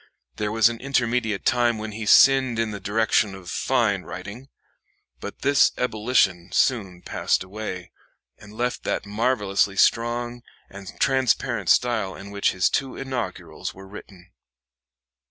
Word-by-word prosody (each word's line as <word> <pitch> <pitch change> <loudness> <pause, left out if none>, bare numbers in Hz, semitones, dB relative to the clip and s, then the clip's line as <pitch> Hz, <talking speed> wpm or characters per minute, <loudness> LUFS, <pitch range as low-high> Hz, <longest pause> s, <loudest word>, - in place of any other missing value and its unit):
There 105 0 -2
was 115 +1 +4
an 115 -1 -4
intermediate 125 -5 -1
time 120 -2 +2
when 110 0 -6
he 105 0 -6
sinned 130 0 +5
in 115 -1 -1
the 100 - -6
direction 105 0 +1
of 90 -2 -9
fine 115 -7 +1
writing; 100 +11 -9 0.7
but 100 - -9
this 140 0 +4
ebullition 105 -7 0
soon 95 -9 0
passed - - -1
away, 95 -2 -7 0.5
and 105 - -14
left 120 +3 -3
that - - -2
marvelously 105 -2 0
strong 120 +2 +1 0.3
and 100 -1 -9
transparent 130 -2 +1
style 110 -6 +2
in 100 +1 -10
which 100 0 +1
his 90 -1 +1
two 135 -2 -2
inaugurals 125 -8 -5
were 95 +1 -12
written. 95 -2 -13
110 Hz, 135 wpm, -24 LUFS, 100-120 Hz, 0.7 s, sinned